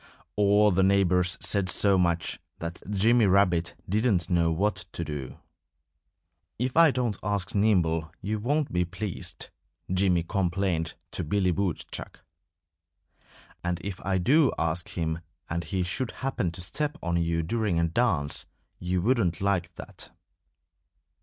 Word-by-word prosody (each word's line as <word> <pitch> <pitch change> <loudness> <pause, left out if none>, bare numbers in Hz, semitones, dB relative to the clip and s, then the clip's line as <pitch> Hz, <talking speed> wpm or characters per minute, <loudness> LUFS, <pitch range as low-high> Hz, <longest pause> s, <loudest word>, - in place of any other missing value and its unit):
All 105 +1 +4
the 95 +1 +2
neighbors 95 -2 +3
said 100 -3 +1
so 100 +1 +4
much 85 -2 0 0.2
that 85 +1 -6
Jimmy 110 +3 +3
Rabbit 90 -3 +3
didn't 100 -4 +1
know 85 -2 +3
what 95 +5 0 0.2
to 85 - -3
do. 70 -4 -6 1.2
"If 125 +2 -2
I 165 0 +7
don't 125 -6 -1
ask 100 -2 -2
Nimble 85 -7 +2
you 105 +2 -2
won't 145 - 0
be 90 0 +2
pleased," 95 +2 -6 0.4
Jimmy 90 -2 +2
complained 90 -3 -1 0.2
to - - -3
Billy 90 +3 +1
Woodchuck. 95 -1 -4 1.4
"And 90 0 -1
if 95 -2 -6
I 95 0 +1
do 135 - +4
ask 80 +1 -1
him 80 -1 -2 0.3
and 85 +1 -3
he 95 -2 -1
should 100 +8 -2 0.2
happen 125 -9 0
to 90 - -7
step 145 +11 -2
on 85 0 0
you 85 0 0
during 105 0 0
a 85 - +2
dance 80 -7 0 0.3
you 90 0 -1
wouldn't 100 -8 +1
like 95 -3 0
that." - - -9
95 Hz, 140 wpm, -27 LUFS, 85-105 Hz, 1.4 s, I